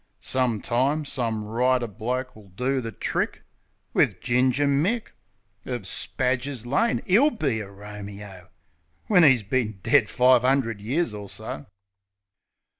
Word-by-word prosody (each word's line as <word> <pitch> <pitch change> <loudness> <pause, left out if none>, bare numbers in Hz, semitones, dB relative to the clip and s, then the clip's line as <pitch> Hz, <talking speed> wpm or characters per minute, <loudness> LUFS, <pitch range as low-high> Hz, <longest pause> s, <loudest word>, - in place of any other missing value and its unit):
Some 125 -5 0
time, 140 +6 +1
some 115 -6 -2
writer 125 +3 +1
bloke 125 +4 -4
will 105 -2 -15
do 125 +7 -1
the 115 -1 -5
trick - - -2 0.5
Wiv - - +2
Ginger 130 +3 +2
Mick, 170 +12 +1 0.5
Of 125 -4 -4
Spadger's 125 +4 -2
Lane. 145 - +1
'E'll 230 +11 +5
be 140 - -1
a 100 -2 -7
Romeo, 100 -2 -10 0.6
When 180 -5 +5
'e's 130 -7 +5
bin 110 -2 -1
dead 135 -7 +4
five 125 -1 +4
'undred 125 -5 +1
years 130 +5 0
or 105 -1 -7
so. 75 - -6
125 Hz, 130 wpm, -25 LUFS, 110-135 Hz, 0.6 s, E'll